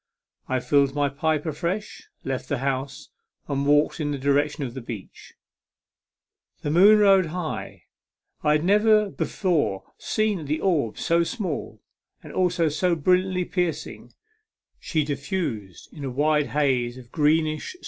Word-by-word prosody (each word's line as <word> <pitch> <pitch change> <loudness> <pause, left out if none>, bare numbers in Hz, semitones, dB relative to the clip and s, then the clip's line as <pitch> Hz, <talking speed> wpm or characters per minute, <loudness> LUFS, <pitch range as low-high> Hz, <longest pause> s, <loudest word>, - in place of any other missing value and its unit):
I 130 - +1
filled 140 0 +2
my 145 -1 +1
pipe 155 +2 -1
afresh, 170 +7 -4
left 130 -1 -4
the 145 - 0
house, 135 +1 -3 0.4
and 140 0 -1
walked 145 +3 +3
in 150 -2 -1
the 145 - -2
direction 145 +2 +1
of 125 -3 -5
the 130 - -6
beach. 115 -4 -10 1.3
The 145 - -1
moon 200 +6 +7
rode 195 -4 +5
high; 170 0 -5 0.6
I 150 - +3
had 150 +1 +1
never 210 +2 +4
before 160 - -1 0.2
seen 215 -7 -1
the 150 +2 -1
orb 150 - 0
so 170 0 +2
small 165 - -4 0.4
and - - -10
also 180 -2 +1
so 170 +4 +1
brilliantly 180 +3 +1
piercing; 175 -5 -3 0.7
she 155 -2 -1
diffused 140 - -4
a 140 -3 -5
wide 150 +3 +1
haze 130 -4 0
of 125 -1 -13
greenish 155 - +1
W. 365 - -19
150 Hz, 140 wpm, -24 LUFS, 140-180 Hz, 1.3 s, moon